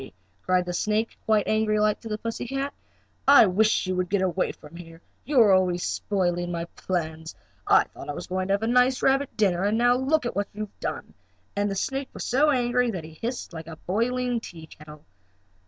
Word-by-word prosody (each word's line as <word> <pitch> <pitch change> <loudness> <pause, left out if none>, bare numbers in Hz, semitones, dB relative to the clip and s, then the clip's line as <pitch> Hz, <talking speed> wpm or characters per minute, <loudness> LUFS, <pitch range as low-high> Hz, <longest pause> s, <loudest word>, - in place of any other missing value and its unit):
cried 185 -1 +1
the 180 - -4
snake, 215 +5 -1
quite 215 -2 +2
angry 215 -1 +1
like, 210 0 +2
to 230 - -10
the 210 - -2
pussy 230 +2 -5
cat, 275 +2 -3 0.5
"I 280 -4 +8
wish 210 +3 +2
you 185 0 -1
would 180 -1 -1
get 200 -1 +1
away 185 0 0
from 150 +2 -15
here! 165 -1 -11 0.3
You 285 -3 +2
are 210 -3 +6
always 180 -2 +2
spoiling 175 -3 -1
my 170 -1 -3
plans. 160 -3 -4 0.3
I - - +6
thought - - -12
I - - -2
was 175 - -6
going 185 0 -2
to 195 - +3
have 200 - -4
a - - 0
nice 250 +2 +3
rabbit 270 +1 +1
dinner, 190 -4 +2
and 205 +2 +1
now 245 +1 +4
look 265 +2 +1
at 240 - -3
what 200 0 -1
you 210 - -6
have 210 - -8
done," - - -5 0.4
and 205 0 0
that 195 - -3
snake 270 +7 -2
was - - -5
so 280 +5 +3
angry 250 -2 +2
that 185 -7 -4
he 160 0 -11
hissed 235 +5 -5
like 160 -1 -8
a 165 - -8
boiling 240 +7 -1
teakettle. 155 -5 -12
205 Hz, 215 wpm, -25 LUFS, 175-240 Hz, 0.5 s, I